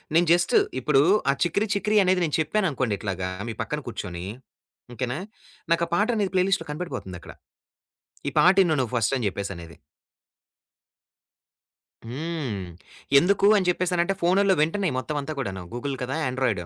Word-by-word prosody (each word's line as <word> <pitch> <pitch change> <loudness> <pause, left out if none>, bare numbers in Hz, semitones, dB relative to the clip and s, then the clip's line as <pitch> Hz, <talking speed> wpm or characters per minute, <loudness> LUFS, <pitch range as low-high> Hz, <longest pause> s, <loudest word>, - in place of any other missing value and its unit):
నేను 170 +1 +5
జస్టు 175 0 +4 0.2
ఇప్పుడు 135 +1 +3 0.3
ఆ - - +1
'చికిరి 200 +5 +1
చికిరి' 210 +1 +2
అనేది 185 -1 +2
నేను 150 - -1
చెప్పాననుకోండి 150 - 0
ఇట్లాగా 95 -3 -3 0.2
మీ - - -3
పక్కన - - -3
కూర్చొని. 85 0 -6 0.7
ఓకేనా! 125 +3 -3 0.5
నాకా 170 0 +3
పాట 210 +5 +2
అనేది 200 -4 0
ప్లే 185 - +4
లిస్ట్‌లో 195 -4 0
కనపడిపోతుందక్కడ. 125 - -6 0.9
ఈ - - +2
పాటిను 180 -3 +5
నువ్వు 125 -2 -2
ఫస్ట్ 115 +3 +1
అని 115 - -1
చెప్పేసనేది. 90 -4 -7 2.3
హ్మ్. 130 - -4 0.5
ఎందుకు 195 +4 +2
అని 190 -3 +1
జెప్పేసనంటే 180 +1 +1
ఫోనుల్లో 190 +3 +3
వెంటనే 185 +4 +1
మొత్తం 150 +4 -3
అంతా 155 +3 -5
కూడాను. 95 -8 -4
గూగుల్ 135 +3 -3
కదా! 130 +3 -3
యాండ్రాయిడు 125 -8 -1
155 Hz, 135 wpm, -25 LUFS, 120-185 Hz, 2.3 s, నేను